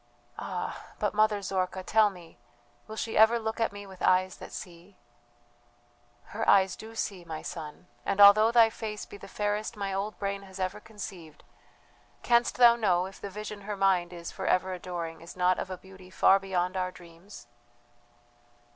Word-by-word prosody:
"Ah, -, -, -5 dB
but, -, -, -1 dB
Mother 210 Hz, -1 st, +2 dB
Zorka, 185 Hz, 0 st, -2 dB
tell 215 Hz, +2 st, +4 dB
me, 175 Hz, -8 st, -14 dB, 0.5 s
will 220 Hz, -, -7 dB
she 220 Hz, 0 st, -4 dB
ever 220 Hz, +2 st, +6 dB
look 220 Hz, 0 st, -4 dB
at 225 Hz, -, +1 dB
me 205 Hz, 0 st, -9 dB
with 190 Hz, -2 st, -13 dB
eyes 185 Hz, 0 st, +2 dB
that -, -, -10 dB
see?" 175 Hz, +2 st, -10 dB, 1.4 s
"Her 225 Hz, +2 st, 0 dB
eyes 190 Hz, -2 st, +5 dB
do 225 Hz, +1 st, -11 dB
see, 195 Hz, -5 st, -3 dB
my 160 Hz, -2 st, -7 dB
son, 155 Hz, +1 st, -7 dB, 0.2 s
and 200 Hz, -, -2 dB
although 210 Hz, +2 st, +8 dB
thy 230 Hz, -2 st, +6 dB
face 215 Hz, -2 st, -6 dB
be -, -, -11 dB
the 195 Hz, -, -11 dB
fairest 210 Hz, +2 st, -2 dB
my 200 Hz, -1 st, -3 dB
old 200 Hz, +2 st, -3 dB
brain 200 Hz, 0 st, -3 dB
has 190 Hz, -1 st, -12 dB
ever 185 Hz, +2 st, -2 dB
conceived, 190 Hz, -8 st, -10 dB, 0.8 s
canst 235 Hz, 0 st, +3 dB
thou 240 Hz, -1 st, +8 dB
know 185 Hz, -6 st, +2 dB
if 190 Hz, 0 st, -11 dB
the 200 Hz, -, -5 dB
vision 210 Hz, +1 st, -7 dB
her 205 Hz, 0 st, -5 dB
mind 185 Hz, -3 st, +2 dB
is 170 Hz, -1 st, -7 dB
for 190 Hz, -, -5 dB
ever 185 Hz, +1 st, +2 dB
adoring 170 Hz, -2 st, -6 dB
is 170 Hz, +2 st, -11 dB
not 180 Hz, 0 st, +2 dB
of -, -, -4 dB
a 185 Hz, -, -5 dB
beauty 190 Hz, 0 st, -15 dB
far 190 Hz, +1 st, +4 dB
beyond 185 Hz, -1 st, -2 dB
our 185 Hz, -1 st, -1 dB
dreams? 170 Hz, -, -14 dB
195 Hz, 180 wpm, -29 LUFS, 180-210 Hz, 1.4 s, although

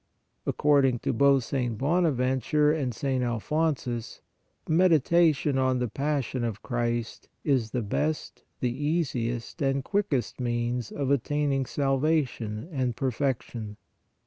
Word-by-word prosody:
According 140 Hz, -4 st, +3 dB
to -, -, 0 dB
both 140 Hz, +1 st, +4 dB
St. 120 Hz, -3 st, -2 dB
Bonaventure 145 Hz, -1 st, +2 dB
and 145 Hz, -5 st, -1 dB
St. 130 Hz, +2 st, -1 dB
Alphon 150 Hz, +6 st, 0 dB
sus, 120 Hz, -3 st, -6 dB, 0.5 s
meditation 160 Hz, -3 st, +3 dB
on 130 Hz, -1 st, +2 dB
the 125 Hz, 0 st, 0 dB
passion 135 Hz, 0 st, -2 dB
of 110 Hz, -3 st, -3 dB
Christ 120 Hz, -2 st, -2 dB
is 130 Hz, -6 st, +1 dB
the 120 Hz, +1 st, -2 dB
best, 150 Hz, +9 st, -2 dB, 0.2 s
the 125 Hz, -1 st, 0 dB
easiest 130 Hz, -7 st, -2 dB
and 135 Hz, -1 st, +1 dB
quickest 155 Hz, -, -1 dB
means 120 Hz, -1 st, -1 dB
of 140 Hz, -2 st, -2 dB
attaining 140 Hz, 0 st, +1 dB
salvation 135 Hz, -5 st, 0 dB
and 130 Hz, -5 st, -1 dB
perfection. 120 Hz, -4 st, -2 dB
135 Hz, 120 wpm, -27 LUFS, 120-150 Hz, 0.5 s, both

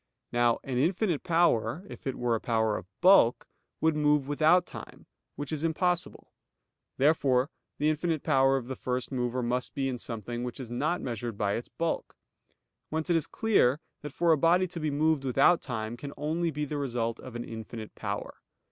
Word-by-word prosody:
Now 120 Hz, -1 st, +3 dB
an 130 Hz, -2 st, -2 dB
infinite 175 Hz, -, +1 dB
power, 165 Hz, -, +2 dB
if -, -, -9 dB
it 135 Hz, -, -1 dB
were 120 Hz, -1 st, 0 dB
a 115 Hz, -, -1 dB
power 110 Hz, -2 st, +1 dB
of 90 Hz, -, -6 dB
bulk, 180 Hz, -10 st, +5 dB, 0.3 s
would 160 Hz, -1 st, +3 dB
move 150 Hz, -2 st, +2 dB
without 160 Hz, +5 st, +4 dB
time, -, -, -11 dB, 0.3 s
which 145 Hz, +1 st, -5 dB
is 155 Hz, -1 st, -2 dB
impossible; 175 Hz, +2 st, -1 dB, 0.6 s
therefore 135 Hz, -2 st, +3 dB, 0.3 s
the 150 Hz, -, +1 dB
infinite 155 Hz, 0 st, 0 dB
power 135 Hz, -3 st, +4 dB
of 125 Hz, -3 st, -5 dB
the 130 Hz, -, -4 dB
first 125 Hz, +1 st, -3 dB
mover 125 Hz, -1 st, -1 dB
must 125 Hz, +1 st, -2 dB
be 135 Hz, -1 st, 0 dB
in 125 Hz, -2 st, -3 dB
something 120 Hz, +1 st, -5 dB
which 125 Hz, +1 st, -5 dB
is 120 Hz, -3 st, -7 dB
not 155 Hz, +9 st, 0 dB
measured 120 Hz, -3 st, -4 dB
by 100 Hz, -1 st, 0 dB
its 120 Hz, -, -4 dB
bulk. 165 Hz, -1 st, -3 dB, 0.7 s
Whence 160 Hz, +2 st, -2 dB
it -, -, +4 dB
is 165 Hz, -2 st, +1 dB
clear 155 Hz, -, +2 dB, 0.2 s
that 150 Hz, -, -6 dB
for 170 Hz, +4 st, +2 dB
a 160 Hz, -, +5 dB
body 175 Hz, +4 st, +4 dB
to 170 Hz, -, -6 dB
be 155 Hz, -1 st, -1 dB
moved 150 Hz, 0 st, +1 dB
without 135 Hz, +6 st, +4 dB
time 110 Hz, -2 st, -4 dB
can 140 Hz, +3 st, -8 dB
only 160 Hz, +4 st, -1 dB
be 150 Hz, -1 st, -2 dB
the 150 Hz, +1 st, -4 dB
result 120 Hz, -5 st, -2 dB
of 130 Hz, -2 st, -10 dB
an 120 Hz, -, -3 dB
infinite 110 Hz, -1 st, -8 dB
power. 100 Hz, -1 st, -5 dB
135 Hz, 190 wpm, -29 LUFS, 120-160 Hz, 0.7 s, bulk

